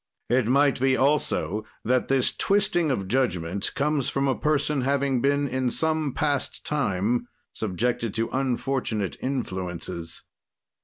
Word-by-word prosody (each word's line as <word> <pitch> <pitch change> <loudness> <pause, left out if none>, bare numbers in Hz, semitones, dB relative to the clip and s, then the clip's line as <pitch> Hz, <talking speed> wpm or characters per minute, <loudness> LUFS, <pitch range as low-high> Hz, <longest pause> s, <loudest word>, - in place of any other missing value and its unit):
It 125 -2 +3
might 140 +2 +3
be, 130 0 +3
also, 140 -6 +1 0.2
that 125 +2 +2
this 135 -2 +2
twisting 195 -5 +2
of 100 -8 -1
judgment 95 -6 0
comes 145 -2 +1
from 135 0 0
a 135 - +3
person 150 -1 0
having 135 -1 +1
been, 140 +1 +2
in 130 -1 0
some 155 +1 0
past 145 -3 -1
time, 120 -3 0 0.3
subjected 110 +2 -1
to 115 0 0
unfortunate 130 -5 -1
influences. 90 -9 -4
130 Hz, 125 wpm, -25 LUFS, 110-140 Hz, 0.3 s, It